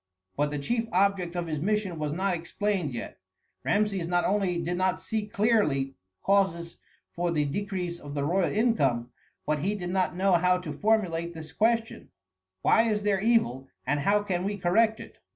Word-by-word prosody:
But 145 +1 +1
the 145 - -3
chief 225 +11 -1
object 185 -2 +1
of 175 -1 -1
his 155 -3 -3
mission 195 -1 -1
was 150 -1 -2
not 190 +4 0
explained 180 -1 -2
yet. 120 -1 -7 0.4
Rameses 200 -4 +1
not 175 0 +1
only 190 -3 +1
did 170 +1 -2
not 185 0 +1
see 215 +1 -3
clearly 200 - +1 0.3
causes 190 -4 +1 0.3
for 175 0 -1
the 155 -3 +1
decrease 180 +2 -3
of 145 0 -8
the 140 - -1
royal 180 +4 +1
income, 140 - +1 0.3
but 150 0 0
he 195 +8 -1
did 180 -3 -4
not 185 -1 0
know 190 +2 +2
how 180 +1 +4
to 175 -5 -6
formulate 170 -3 0
this 160 -1 -8
question: 225 +1 0 0.5
Why 225 0 +4
is 210 -1 0
there 200 -2 +2
evil, 165 - +2 0.2
and 145 +3 +1
how 205 +8 +2
can 180 -3 -1
we 200 +1 -2
correct 220 +5 +2
it? - - -12
180 Hz, 180 wpm, -27 LUFS, 165-205 Hz, 0.5 s, how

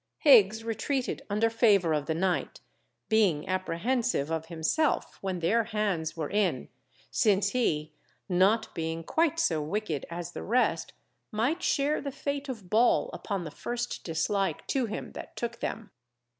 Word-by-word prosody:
Higgs 225 -6 +6
retreated 245 +4 -2
under 210 +3 +2
favour 200 -8 +4
of 145 -1 -1
the 160 - 0
night, 185 +2 -1 0.5
being 200 -9 +2
apprehensive 185 - 0
of 160 0 -2
himself 170 - 0
when 185 -3 -3
their 225 +7 +2
hands 205 -8 -1
were 155 -3 -3
in, 205 -1 0 0.4
since 200 -2 +3
he, 155 -11 0 0.3
not 200 +5 +2
being 165 0 -3
quite 325 - +1
so 165 - +1
wicked 160 -2 -3
as 170 0 -5
the - - -6
rest, 220 -7 +1 0.4
might 250 +11 0
share 290 -2 +1
the 280 - -4
fate 280 +1 -4
of 220 -8 -6
Ball 230 +6 +3
upon 195 -4 -3
the 155 - -6
first 240 +6 -4
dislike 190 +4 -1
to 260 -4 0
him 210 - -5
that - - -9
took 235 0 -4
them. 220 -4 -4
205 Hz, 150 wpm, -29 LUFS, 170-235 Hz, 0.5 s, Higgs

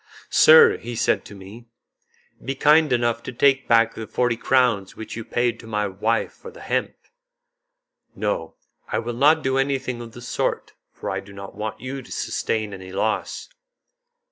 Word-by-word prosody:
"Sir," 470 -2 +7
he 120 - -7
said - - +1
to 100 - -11
me, 100 +5 -12 0.8
"be 135 - -3
kind 150 +2 +4
enough 120 -1 +1
to - - -7
take 135 +1 +2
back 115 -1 +4
the 110 - -7
forty 120 +2 0
crowns 120 -6 +1
which 110 - -8
you 115 - -5
paid 120 0 -1
to 115 - -12
my 105 -1 -1
wife 105 +4 -1
for 470 - -12
the 480 +2 -14
hemp." - - -2 1.2
"No, - - -3 0.3
I - - -2
will 120 +1 -3
not 150 +6 +4
do 130 0 +1
anything 135 -3 -1
of 115 -1 -10
the 120 - -11
sort, 125 - -2 0.2
for - - -6
I - - -2
do 100 0 -13
not 100 0 -9
want 105 +2 -5
you 135 +2 -5
to - - -16
sustain 110 -2 -2
any 95 -1 -9
loss." 105 +3 -2
120 Hz, 175 wpm, -23 LUFS, 110-135 Hz, 1.2 s, Sir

